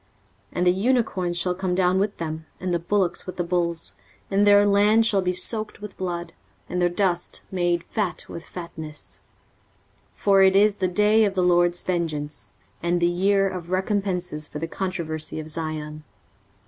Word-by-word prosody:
23:034:007 - - -38 0.4
And 180 - 0
the - - +7
unicorns 190 -4 0
shall 180 +1 +1
come 180 0 -2
down 185 0 +2
with 200 +1 -1
them, 160 -1 -5
and 180 -1 -2
the 170 - +1
bullocks 175 0 0
with 185 - -6
the 175 - 0
bulls; 170 -1 -1 0.4
and 200 +1 +3
their 205 0 +7
land 205 +3 +4
shall 200 -4 +2
be 180 -1 0
soaked 215 +4 -1
with 210 -1 -9
blood, 175 -2 -4 0.3
and 180 0 -2
their 175 - +3
dust 175 -1 -1
made 175 -2 0
fat 205 -3 -2
with 170 - -8
fatness. 155 - -8 1.0
23:034:008 - - -28
For 195 -1 +5
it 190 0 +5
is 205 +1 +4
the 185 - +1
day 210 +4 +4
of 200 -2 0
the 185 - +2
LORD's 175 0 +3
vengeance, 155 -5 -3 0.3
and 175 +1 +1
the 170 - +2
year 195 +3 +2
of 180 -3 -6
recompences 185 -5 -1
for - - -7
the 165 +2 -3
controversy 165 -4 -2
of 155 - -6
Zion. 155 -1 -4
180 Hz, 180 wpm, -24 LUFS, 170-195 Hz, 1.0 s, the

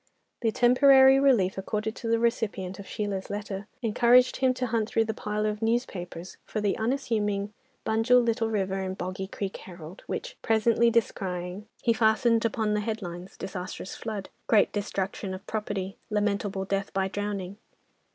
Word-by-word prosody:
The 225 -2 +2
temporary 265 +3 +6
relief 220 -10 +3
accorded 215 +3 -2
to 230 - -5
the 230 0 +3
recipient 210 -5 -1
of 200 - -9
Sheila's 200 -3 -3
letter 205 -1 -5 0.2
encouraged 240 +3 +4
him 260 -1 +3
to 250 - -1
hunt 225 -2 0
through 225 - +2
the 220 - -2
pile 210 0 -2
of 210 0 -2
newspapers 190 -7 -2
for 215 - -4
the 205 -2 +1
unassuming 215 -4 -1 0.3
Bunjil, 225 +3 +4
Little 230 -1 +1
River, 195 -3 -1
and 190 0 -4
Boggy 185 +1 -4
Creek 195 0 -5
Herald, 175 0 -11
which, - - -5
presently 225 +1 +3
descrying, 190 -3 -2 0.2
he 230 - +4
fastened 225 +1 +3
upon 220 -1 0
the 210 - +1
headlines, 190 -4 -5
"Disastrous 185 0 -6
flood." 215 -4 -5 0.2
"Great 215 -3 +4
destruction 195 -1 -3
of 190 +2 -11
property." 205 -2 -3
"Lamentable 205 -2 -1
death 195 +1 -2
by 190 0 +1
drowning." 200 -1 -4
210 Hz, 155 wpm, -27 LUFS, 195-230 Hz, 0.3 s, temporary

